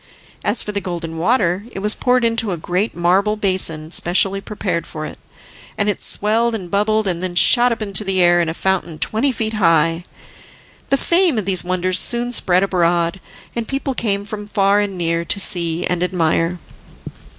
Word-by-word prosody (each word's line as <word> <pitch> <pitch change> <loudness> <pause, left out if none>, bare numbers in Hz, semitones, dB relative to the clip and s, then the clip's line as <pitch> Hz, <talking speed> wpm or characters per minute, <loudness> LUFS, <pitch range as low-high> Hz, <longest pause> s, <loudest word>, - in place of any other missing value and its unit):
As 210 +3 +1
for 210 - -4
the 200 -1 -3
Golden 165 -3 -5
Water 190 -2 +1
it - - -9
was 210 +2 +2
poured 250 -1 +1
into 230 -2 +1
a 175 - -3
great 180 +7 -2
marble 190 +5 +2
basin 185 -6 -1
specially 195 +3 +2
prepared 185 -5 -4
for 155 -1 -6
it, - - -9 0.6
and 205 - 0
it 205 - -2
swelled 225 +3 0
and 180 -5 -7
bubbled 215 +2 +1
and 180 -3 -2
then 185 -1 -4
shot 245 +7 +6
up 230 -1 -2
into 200 -1 -1
the 195 -2 -1
air 175 -1 +4
in 165 - -1
a 160 - -4
fountain 190 -4 -2
twenty 225 - 0
feet 225 -2 -3
high. 165 -4 +2 0.9
The 275 - +3
fame 340 -3 +2
of 210 - -1
these 190 -2 +2
wonders 185 0 0
soon 240 0 +1
spread 185 -4 +3
abroad, 175 -1 0 0.4
and 235 -2 -3
people 275 0 -3
came 200 -4 -1
from 210 -1 -7
far 200 -1 +2
and 200 -2 -2
near 170 -1 -1
to 200 - -1
see 170 -4 -1
and 180 -1 -1
admire. 170 -1 0
195 Hz, 185 wpm, -18 LUFS, 175-215 Hz, 0.9 s, shot